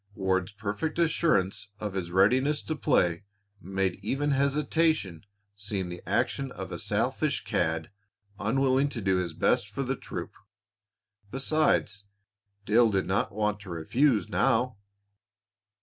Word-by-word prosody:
Ward's 95 0 0
perfect 105 +10 -3
assurance 155 - +1
of 105 -2 -4
his 95 -3 -3
readiness 130 +11 +3
to 155 - -3
play 85 - +1 0.4
made 95 -1 -1
even 140 +8 0
hesitation 140 - +1 0.3
seem 100 -2 -4
the 90 0 -7
action 135 -1 0
of - - -7
a - - -5
selfish - - 0
cad 80 +1 -1 0.5
unwilling 135 +4 +2
to 125 - -5
do 95 -3 +1
his 90 -3 -2
best 100 - +2
for 135 +7 -3
his 130 0 -1
troop. - - -6 1.0
Besides, 135 -6 +1 0.6
Dale 115 +3 +5
did 95 -2 0
not 95 +3 0
want 105 0 -1
to 100 -2 -11
refuse 105 - +1
now. 125 -3 +1
105 Hz, 130 wpm, -28 LUFS, 95-135 Hz, 1.0 s, Dale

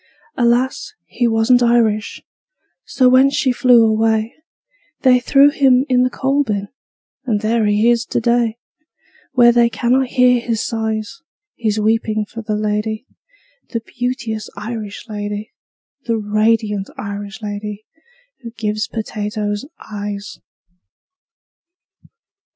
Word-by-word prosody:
Alas, 250 - 0
he 240 - -1
wasn't 225 +2 +3
Irish. 230 -3 +1 0.6
So 255 - +2
when 260 +2 +6
she 275 -1 +1
flew 245 -2 +5
away, 220 0 +1 0.7
They 255 -2 +5
threw 280 +3 +5
him 265 -3 +3
in 250 -1 +3
the 255 - +2
coal 270 +3 0
bin 205 -5 -3 0.6
And 215 -5 0
there 220 0 +1
he 210 +2 +2
is 235 -1 +3
to - - -1
day, 235 -1 +1 0.8
Where 240 -2 +6
they 235 0 +3
cannot 255 +3 +1
hear 250 0 +3
his 230 -2 -2
sighs 220 +5 -3 0.3
His 215 -2 -1
weeping 215 0 0
for 230 +2 -8
the 215 -1 -3
lady, 215 +2 -2 0.6
The 230 - -2
beauteous 235 -3 -4
Irish 210 -1 -6
lady, 210 0 -5 0.6
The 230 -1 +1
radiant 215 -1 0
Irish 205 +2 -7
lady 210 0 -6 0.5
Who 235 - -8
gives 215 -1 -3
potatoes 210 -1 -4 0.2
eyes." 205 -1 -6
225 Hz, 120 wpm, -18 LUFS, 210-245 Hz, 0.8 s, when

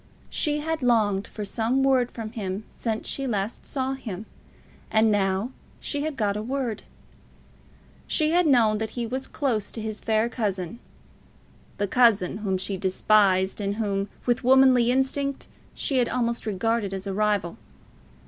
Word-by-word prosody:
She 300 -1 0
had 320 0 -2
longed 215 -5 +2
for 210 - -6
some 230 +6 0
word 260 -2 +3
from 220 -2 -7
him 200 -2 -4
since 220 -2 -3
she 275 -1 -3
last 210 -1 -3
saw 265 -1 -1
him; 220 -7 -6 0.6
and 220 0 +4
now 195 +3 +1 0.3
she 290 - -3
had 305 -2 -3
got 205 -2 +1
a 210 - -2
word. 245 -1 -2 1.3
She 310 -1 +1
had 350 0 +3
known 225 -6 +4
that 220 0 -2
he 240 - -1
was 260 +3 -4
close 235 -8 -1
to - - -5
his 215 -1 -4
fair 220 0 +1
cousin, 205 -4 -3 1.0
the 205 - 0
cousin 210 -5 +3
whom 195 -3 -1
she 190 +1 -3
despised, 190 +1 +2
and 200 0 -1
whom, 200 -2 -1 0.2
with 240 -1 +1
womanly 255 -2 +5
instinct, 265 +2 0 0.3
she 275 - -1
had 245 -2 +2
almost 235 -2 -1
regarded 215 0 0
as 190 +1 -6
a 195 - -3
rival. 205 -4 0
220 Hz, 160 wpm, -25 LUFS, 200-255 Hz, 1.3 s, womanly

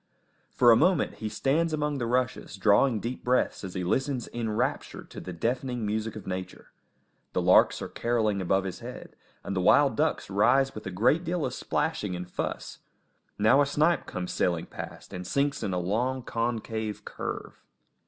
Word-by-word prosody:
For 120 -2 +5
a - - +8
moment 175 +4 +2
he 110 - -4
stands 150 +9 +1
among 150 -2 -1
the 120 - -1
rushes, 125 -3 -1
drawing 105 +4 +3
deep 120 +4 -5
breaths 125 -3 +1
as 95 -2 -6
he 90 - -2
listens 130 +6 -1
enraptured 120 +4 -2
to - - -7
the 90 - -7
deafening 120 +5 -2
music 110 +1 -2
of 110 - -8
nature. 95 0 -6 0.6
The - - +1
larks - - +5
are - - -4
carolling 110 -4 0
above 95 +1 +1
his 95 -2 -5
head, - - -9 0.3
and 100 - -4
the 95 - +1
wild 140 +9 +5
ducks 155 +1 0
rise 125 +7 +3
with 110 - -7
a - - -2
great 115 - +2
deal 175 -2 -1
of 125 - -3
splashing 130 - -1
and 90 0 -6
fuss; - - -5 0.6
now 110 +7 +5
a - - +4
snipe 155 +4 +2
comes 90 0 -4
sailing 85 -2 0
past - - -9
and 90 0 -6
sinks 140 +4 0
in 95 - -2
a 90 - -1
long, 120 +9 -1
concave 110 -3 -3
curve. - - -6
115 Hz, 180 wpm, -28 LUFS, 100-135 Hz, 0.6 s, a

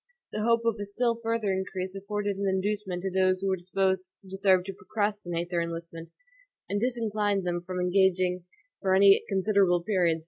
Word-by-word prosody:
The 215 - -3
hope 230 +1 +2
of 225 -2 +1
a 205 - -3
still 230 +3 0
further 225 -3 0
increase 190 0 -4
afforded 205 +1 -3
an 200 +1 -2
inducement 190 -1 -1
to 190 - -2
those 185 0 +2
who 195 - 0
were 190 - +2
disposed 190 +1 -1 0.2
to 190 - -7
serve 190 -2 +4
to 195 +1 -6
procrastinate 190 -3 -3
their 170 -1 +1
enlistment, 165 0 -6 0.6
and 205 +1 -2
disinclined 215 -5 0
them 175 -1 -1
from 180 +1 -5
engaging 180 -1 +2 0.4
for 190 -1 +2
any 195 0 +6
considerable 190 -3 +2
periods. 175 -5 +1
190 Hz, 175 wpm, -28 LUFS, 180-205 Hz, 0.6 s, any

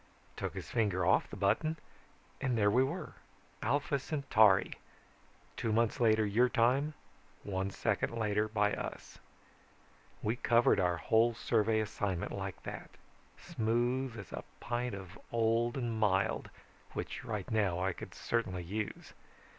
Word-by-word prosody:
Took - - -4
his - - -6
finger 100 -6 +1
off 95 - +3
the - - -7
button 155 +1 +1 0.6
and 130 -4 0
there 105 -1 +4
we 125 +4 +4
were: 135 - -4 0.5
Alpha 140 +3 +1
Centauri. 110 -9 +3 0.8
Two 115 - -1
months 115 0 +2
later 110 -2 +4
your 115 +5 +3
time, 130 +6 +2 0.5
one 95 -1 -2
second - - 0
later 105 -1 +1
by 105 -1 +1
us. - - -6 1.0
We 110 +3 0
covered 120 0 +4
our 90 -1 +2
whole 115 +5 +3
survey 110 -1 +2
assignment 105 -3 -2
like 95 -1 -5
that, - - -7 0.5
smooth 120 +2 -1
as 100 -5 -9
a - - -5 0.2
pint 120 -1 -2
of 95 +1 -10
old 115 +2 +1
and 120 -3 -2
mild 100 -2 +1 0.4
which - - -5
right 105 -3 -4
now 100 -6 +2
I 95 +1 0
could - - -9
certainly 95 -7 -1
use. 105 +4 -5
110 Hz, 140 wpm, -33 LUFS, 100-120 Hz, 1.0 s, there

